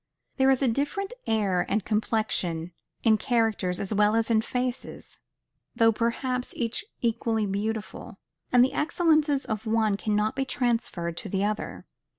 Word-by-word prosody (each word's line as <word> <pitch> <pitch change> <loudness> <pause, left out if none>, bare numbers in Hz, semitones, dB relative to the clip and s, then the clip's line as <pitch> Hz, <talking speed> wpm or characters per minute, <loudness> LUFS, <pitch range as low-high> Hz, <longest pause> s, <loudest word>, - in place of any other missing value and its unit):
There 265 -1 +4
is 270 0 +3
a - - +3
different 290 - -1
air 200 -5 +1
and 210 0 0
complexion 210 -6 -1 0.3
in 220 -2 +4
characters 220 -6 0
as 200 +2 -3
well 210 +1 +3
as 225 0 +1
in 220 -1 +4
faces, 250 +2 -4 0.6
though 225 0 +5
perhaps 250 +3 -2
each 230 -2 -1 0.2
equally 225 -2 0
beautiful; 210 +2 -4 0.3
and 245 0 +6
the 265 - -3
excellences 305 -3 +2
of 220 0 -4
one 220 -2 +2
cannot 210 +3 0
be 270 - 0
transferred 230 -10 -1
to 210 - -5
the 195 +1 0
other. 210 +1 -3
225 Hz, 150 wpm, -27 LUFS, 210-250 Hz, 0.6 s, and